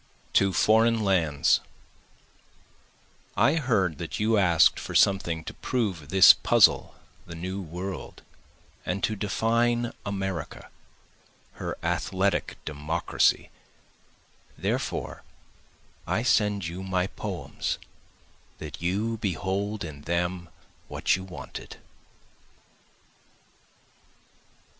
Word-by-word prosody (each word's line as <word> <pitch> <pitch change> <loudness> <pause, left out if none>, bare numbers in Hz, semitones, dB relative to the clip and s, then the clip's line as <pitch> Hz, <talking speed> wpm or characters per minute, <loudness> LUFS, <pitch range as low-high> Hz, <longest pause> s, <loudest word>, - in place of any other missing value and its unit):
To 100 -1 +4
Foreign 110 +5 +3
Lands 80 -8 +3 1.8
I 140 - +4
heard 100 - +1
that 85 - -5
you 110 +1 +2
ask'd 85 -6 +4
for - - -7
something 85 -5 +3
to - - -7
prove 95 - -2
this 95 +2 +9
puzzle - - +3 0.3
the 85 - -8
New 95 +4 -4
World, 90 +2 -7 0.6
And 100 - -3
to 110 - +1
define 115 +4 0
America, 95 -6 -4 0.9
her - - -4
athletic 95 0 0
Democracy, 75 +2 0 1.1
Therefore - - -3 0.9
I 115 - 0
send 105 -6 +2
you 85 +3 -5
my 95 -1 0
poems - - -4 0.8
that 75 -1 -8
you 105 +6 -1
behold 100 +1 -2
in 75 -4 -8
them 85 +1 -2 0.4
what - - +1
you 95 - -6
wanted. 95 -2 -9
95 Hz, 90 wpm, -27 LUFS, 85-105 Hz, 1.8 s, this